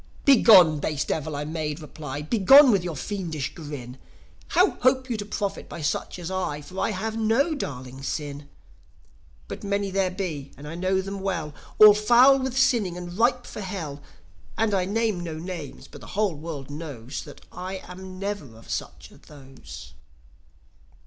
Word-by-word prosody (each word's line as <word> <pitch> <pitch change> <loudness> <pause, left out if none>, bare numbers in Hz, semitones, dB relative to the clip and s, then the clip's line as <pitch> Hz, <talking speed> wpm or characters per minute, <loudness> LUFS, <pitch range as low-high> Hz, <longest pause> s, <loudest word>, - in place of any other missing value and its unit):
"Begone, 195 - +7
base 150 0 -2
Devil!" 155 -1 -3
I 145 +1 -3
made 155 -1 -3
reply 150 -1 -7
"Begone 245 - +7
with 195 -4 +2
your 175 -3 -4
fiendish 160 -3 -4
grin! 140 -6 -8 0.5
How 360 +3 +4
hope 260 0 +2
you 230 - -1
to 205 -1 -6
profit 205 -1 -4
by 165 - -7
such 145 - -2
as 175 0 -6
I? 180 -6 -2
For 185 +5 -8
I - - +1
have 220 +2 -3
no 225 +8 +2
darling 130 - -6
sin. 145 0 -5 1.0
But - - -7
many 200 -1 -1
there 190 -1 +1
be, 170 -7 -5
and 145 +2 -10
I 155 - -6
know 185 +2 0
them 195 +1 -6
well, 170 -6 -3 0.2
All 215 -1 +10
foul 245 +6 +6
with 260 -1 -3
sinning 220 -9 +2
and 175 0 -7
ripe 240 +3 +2
for - - -7
Hell. 165 -7 -5 0.6
And 220 -2 +1
I 185 -2 +2
name 215 -1 0
no 170 -2 -5
names, 165 -3 -7
but - - -13
the - - -11
whole 210 -4 +2
world 145 -3 -7
knows 145 -5 -6
That - - -13
I 185 +1 -6
am 185 +1 -9
never 195 - -5
of 115 - -12
such - - -5
as - - -17
those." 130 - -12
180 Hz, 175 wpm, -25 LUFS, 150-210 Hz, 1.0 s, All